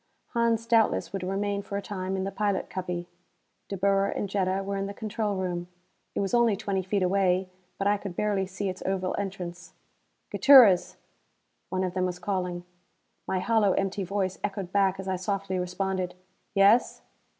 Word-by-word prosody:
Hans 230 -1 +1
doubtless 230 -3 +2
would 195 - -3
remain 200 +2 -1
for 200 0 -5
a - - -2
time 190 -1 -3
in 190 - -1
the 195 - -3
pilot 200 -1 -1
cubby; 180 -2 -4 0.6
De 195 - -3
Boer 195 +1 +2
and 200 - -2
Jetta 190 0 0
were 200 +1 -3
in 195 0 -2
the 200 - -7
control 215 -1 -2
room. 175 -2 -3 0.5
It - - 0
was 195 +2 -2
only 235 -3 +4
twenty 195 -1 -1
feet 190 +1 0
away, 185 0 +2 0.3
but 195 - -2
I 205 +1 +3
could 195 -3 -7
barely 200 -2 0
see 195 +2 -4
its 185 0 -4
oval 185 -1 -1
entrance. 180 -3 -6 0.6
"Gutierrez!" 245 -10 +7 0.7
One 185 0 -1
of 180 -1 -2
them 185 0 0
was 180 -1 -4
calling. 180 -2 -3 0.6
My 190 - 0
hollow 215 -2 +3
empty 195 0 -1
voice 190 0 -2
echoed 195 -3 -3
back 195 -1 +2
as 190 - -6
I 190 -1 0
softly 195 0 -2
responded: 180 0 -2 0.4
"Yes?" 200 +5 +4
195 Hz, 175 wpm, -27 LUFS, 185-200 Hz, 0.7 s, Gutierrez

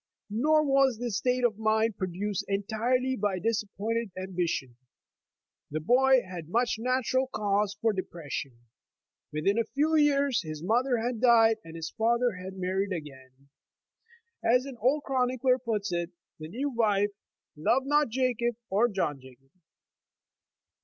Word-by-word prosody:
Nor 305 +8 +3
was 270 -3 +3
this 235 -4 -2
state 250 +2 0
of 220 -3 +1
mind 220 0 +1
produced 190 +2 -3
entirely 230 +6 0
by 205 -4 -1
disappointed 225 +2 -2
ambition. 175 -9 -3 0.9
The 155 - -2
boy 255 +8 +4
had 175 -4 -8
much 235 +2 +1
natural 255 +2 +1
cause 205 -4 0
for 225 -1 +2
depression. 145 -9 -6 0.7
Within 195 +9 +1
a - - +3
few 310 +3 +2
years 285 -4 +3
his 155 -2 -7
mother 245 +6 +2
had 235 0 -2
died, 225 -3 +5
and 165 0 -11
his 165 0 -5
father 235 +2 +1
had 190 +1 -8
married 190 +2 -1
again. 140 -4 -8 0.9
As 250 +3 +3
an 270 -3 -8
old 275 +6 +2
chronicler 255 -1 +1
puts 215 -5 -2
it, 170 0 -1 0.3
the 155 - -7
new 265 - -3
wi*e 210 -4 +2 0.5
''loved 210 - +1
not 295 -1 +2
Jacob 240 -1 0 0.2
or 210 +5 +4
John 170 - -2
Jacob." 130 +1 -17
220 Hz, 140 wpm, -28 LUFS, 185-250 Hz, 0.9 s, died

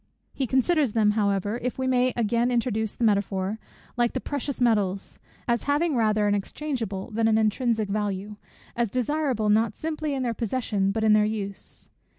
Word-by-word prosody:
He 265 - -2
considers 265 0 +2
them 215 -2 +3
however, 205 +1 0
if 250 0 -3
we 260 - -1
may 255 0 +2
again 235 +1 +1
introduce 225 -3 -1
the - - -3
metaphor, 200 -1 +1 0.4
like 240 -1 +2
the - - -1
precious 285 -1 -4
metals, 205 -6 0 0.3
as 235 -1 0
having 300 +1 +2
rather 215 -2 +2
an 205 - +2
exchangeable 225 -1 -3
than 225 +1 +1
an 220 -1 +3
intrinsic 220 0 +1
value, 205 0 -3 0.4
as 235 -2 0
desirable 255 -2 0
not 215 +1 +2
simply 310 -2 -3
in 265 - -2
their 235 -2 0
possession, 220 -4 -1
but 220 +2 -1
in 215 -1 +5
their 215 0 +5
use. 205 -2 -5
225 Hz, 170 wpm, -26 LUFS, 210-255 Hz, 0.4 s, in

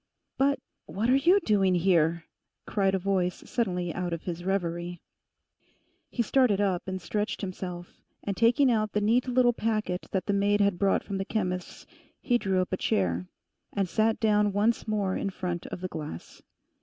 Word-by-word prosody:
'But 280 +1 +2 0.3
what 220 +6 0
are - - +6
you 340 +9 +5
doing 195 - +2
here?' 170 -2 +2 0.4
cried 195 -2 +1
a - - +2
voice 185 -2 -1
suddenly 180 -7 -1
out 175 -1 -3
of 165 - -5
his 175 -1 -5
reverie. 175 -2 -2 1.1
He 235 - -1
started 240 -4 +3
up 190 -3 0
and 190 0 -3
stretched 210 +4 -3
himself, 180 -2 -6 0.2
and 200 - -2
taking 245 +5 +4
out 215 -2 0
the 210 - +2
neat 230 +5 +2
little 250 -1 +3
packet 215 -5 -2
that 190 -2 -2
the 205 - 0
maid 200 +1 +2
had 200 -3 +2
brought 195 -1 +2
from 195 -2 -4
the - - 0
chemist's, 180 -4 -3 0.3
he 245 -3 +1
drew 190 -3 +1
up 185 - -8
a - - +1
chair, 90 - 0 0.5
and 195 -2 0
sat 220 +4 +1
down 210 -2 +3
once 215 +4 +1
more 205 -3 0
in 200 - -1
front 180 -2 -4
of 175 - -7
the 185 - -2
glass. 150 - -8
195 Hz, 180 wpm, -28 LUFS, 180-215 Hz, 1.1 s, are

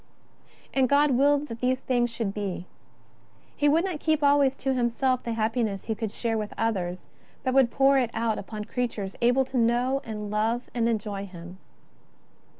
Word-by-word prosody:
And 260 -2 +2
God 285 +1 +4
willed 285 +3 +3
these 255 +1 +1
things 245 -2 +1
should 230 -4 -3
be. 195 -4 -4 0.9
He 290 - +3
would 325 +5 +3
not 360 -6 -3
keep 310 -1 +1
always 280 -2 +4
to 270 -1 -1
Himself 255 +1 +1
the 235 - -3
happiness 220 -3 -1
He 225 - -1
could 220 -1 -4
share 225 0 -2
with 210 -1 -5
others, 185 -6 -2 0.4
but 260 -1 0
would 265 -3 +5
pour 270 +2 +4
it 245 -3 0
out 225 -1 -1
upon 210 +1 -6
creatures 220 -6 -3
able 250 +3 +3
to 265 0 -4
know 245 +4 +2
and 210 -2 -6
love 225 +3 -1
and 235 -1 +1
enjoy 205 -3 -3
Him. 180 0 -11
235 Hz, 170 wpm, -26 LUFS, 215-265 Hz, 0.9 s, would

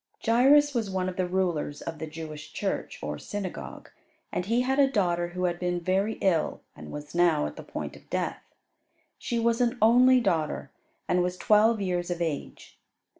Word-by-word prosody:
Jairus 275 +5 +5
was 225 -5 -1
one 185 -1 -1
of 185 - -7
the 185 -1 0
rulers 175 -5 -1
of 160 -2 -6
the 160 - -4
Jewish 155 -1 -8
church, - - -3
or 75 -1 -4
synagogue, 200 -3 -6 0.4
and 180 - -2
he 235 +3 +2
had 265 +2 0
a 275 -1 +5
daughter 175 -7 +1
who 180 +1 -5
had 175 -1 0
been 180 0 -1
very 190 +5 0
ill 175 -5 +1
and 75 0 -10
was 150 0 -8
now 170 -3 +3
at - - -5
the - - -8
point - - -6
of - - -17
death. - - -2 0.8
She 235 - -2
was 230 +1 +2
an 245 +1 +1
only 250 +4 +6
daughter, 160 - -1 0.4
and 180 - +2
was 180 0 -1
twelve 215 +2 +4
years 180 -2 -1
of 175 -1 -2
age. 160 -4 -5
180 Hz, 185 wpm, -27 LUFS, 170-230 Hz, 0.8 s, only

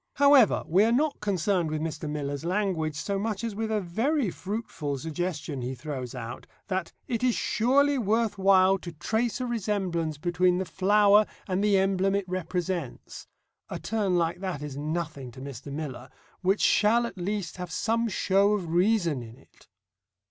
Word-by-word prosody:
However, 280 -5 +5
we 185 +5 +4
are 225 - +3
not 290 +5 +1
concerned 190 -4 0
with 155 0 -2
Mr. 155 -1 -4
Miller's 145 -1 -3
language 175 -4 -1
so 195 +6 -2
much 215 0 -2
as 230 -2 -2
with 220 +2 -3
a 215 -1 +1
very 225 - 0
fruitful 185 -9 -4
suggestion 155 -1 -4
he 125 +2 -3
throws 130 -1 -6
out, 115 +2 -7 0.2
that 185 -3 -2 0.2
"it 235 -1 -2
is 250 -2 +3
surely 275 +4 +2
worth 220 -1 0
while 190 0 +5
to 175 -2 -8
trace 220 - -1
a 255 - -2
resemblance 190 -9 -1
between 180 +3 +2
the 190 - -1
flower 205 +3 +4 0.2
and 190 +1 0
the 205 -2 +4
emblem 195 0 +2
it 200 -1 -1
represents" 180 -4 -4 0.4
(a - - -4
turn 205 -5 0
like 170 0 0
that 185 -7 -4
is 145 -2 -6
nothing 150 -2 -4
to - - -11
Mr. 140 0 -8
Miller) 140 -4 -6 0.3
"which 195 +2 +2
shall 230 +3 +4
at 195 -5 -7
least 195 -1 -3
have 180 -2 -6
some 230 +6 0
show 200 0 +2
of 185 -5 -2
reason 175 - +2
in 115 0 -11
it." 135 - -23
185 Hz, 170 wpm, -27 LUFS, 160-210 Hz, 0.4 s, However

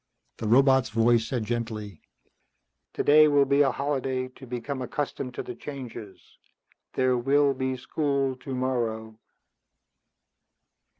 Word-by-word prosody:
The 110 - -4
robot's 130 +3 +4
voice 115 +1 +2
said 120 -3 -2
gently, 110 -5 -4 0.9
"Today 155 +1 +5
will 145 -1 +4
be 140 +1 +3
a 140 - +4
holiday 130 -2 -2
to 130 +1 -14
become 125 +3 -4
accustomed 130 -1 -4
to - - -4
the - - -7
changes. 120 -6 -9 0.7
There 130 -1 +1
will 140 +3 +3
be 130 0 -2
school 140 0 -1
tomorrow." 120 -4 -3
130 Hz, 115 wpm, -26 LUFS, 120-140 Hz, 0.9 s, Today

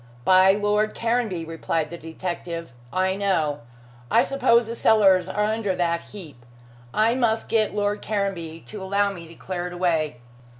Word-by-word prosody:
"By 185 +1 +6
Lord 210 +1 0
Caranby," 230 -7 -1
replied 165 -1 -2
the - - -5
detective. 165 -1 -6 0.2
"I 185 +1 +1
know. 175 -8 0 0.5
I - - +4
suppose 240 -4 +3
the 230 - -5
cellars 190 -6 +4
are 210 +2 0
under 210 -2 0
that 170 -1 0
heap. 155 - -12 0.5
I 220 +2 +2
must 230 -3 0
get 215 -2 +1
Lord 205 0 0
Caranby 185 -6 -3
to 210 -2 -8
allow 200 +1 +1
me 170 -4 -9
to 165 - -14
clear 180 0 -4
it 180 - -8
away." 165 -6 0
190 Hz, 160 wpm, -24 LUFS, 170-210 Hz, 0.5 s, By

